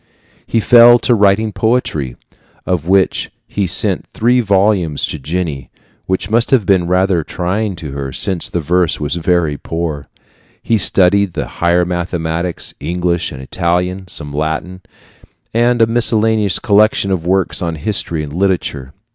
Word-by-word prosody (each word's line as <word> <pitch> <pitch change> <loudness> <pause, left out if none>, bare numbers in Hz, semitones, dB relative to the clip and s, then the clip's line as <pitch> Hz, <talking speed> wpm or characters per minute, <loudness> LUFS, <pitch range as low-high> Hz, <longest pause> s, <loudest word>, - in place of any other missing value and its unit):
He 115 - +1
fell 120 +2 +7
to 120 - +1
writing 105 0 +2
poetry, 80 - -1 0.5
of 85 -3 -2
which 95 0 +1 0.2
he 100 -2 -2
sent 95 +1 +2
three 120 +3 +2
volumes 100 -7 +1
to 75 - -6
Jenny 75 -2 -4 0.4
which 95 0 -1
must 115 +2 +2
have 125 -7 +2
been 90 -3 +2
rather 90 -1 +1
trying 95 +5 -3
to 80 -5 -7
her, 70 -1 -5
since 90 +6 -2
the 85 - -2
verse 90 +2 0
was 75 -1 -2
very 85 -3 0
poor. 80 -4 -4 0.6
He 115 -2 +1
studied 95 0 +3
the - - -3 0.2
higher 85 +1 +3
mathematics, 85 -1 -3
English 85 -1 -2
and 65 -2 -9
Italian, 90 +5 -2
some 75 -5 -5
Latin, 80 +5 -3 0.7
and 120 0 +2
a - - +6
miscellaneous 110 -3 +2
collection 105 -1 +2
of 85 -3 -2
works 95 0 0
on 85 -2 -2
history 80 -1 -2
and 75 -1 -8
literature. 85 -7 -2
90 Hz, 145 wpm, -15 LUFS, 80-100 Hz, 0.7 s, fell